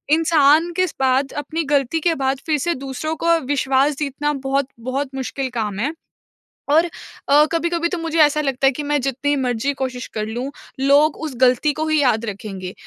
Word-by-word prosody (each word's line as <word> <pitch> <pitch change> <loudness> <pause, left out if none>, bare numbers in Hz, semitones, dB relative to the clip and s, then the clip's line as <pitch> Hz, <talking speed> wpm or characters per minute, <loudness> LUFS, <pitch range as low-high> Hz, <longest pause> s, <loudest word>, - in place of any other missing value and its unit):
इंसान 320 0 +4
किस 370 -2 0
बाद 265 +1 +2
अपनी 310 +3 -2
गलती 280 +3 +1
के 335 +1 +2
बाद 270 -1 0
फिर 310 -2 +1
से 340 +5 0
दूसरों 310 +4 -3
को 335 0 +4
विश्वास 275 +1 +1
जीतना 295 0 -1
बहुत-बहुत 270 -1 -3
मुश्किल 265 0 -3
काम 210 -3 -3
है। 285 +8 -1 0.8
और 320 +3 +5 0.4
अ, 295 +2 +6
कभी-कभी 340 0 0
तो 355 - -3
मुझे 330 -1 -3
ऐसा 300 0 +4
लगता 270 -2 +1
है - - +5
कि 295 +3 -5
मैं 295 0 0
जितनी 275 +2 -1
मर्ज़ी 255 0 -1
कोशिश 255 -2 -3
कर 215 -1 -2
लूँ, 245 +5 -4 0.3
लोग 285 +3 +4
उस 305 - -4
गलती 255 +4 +4
को 310 +2 -2
ही 310 -1 +2
याद 235 -4 +2
रखेंगे 195 -3 -6
280 Hz, 180 wpm, -20 LUFS, 260-310 Hz, 0.8 s, अ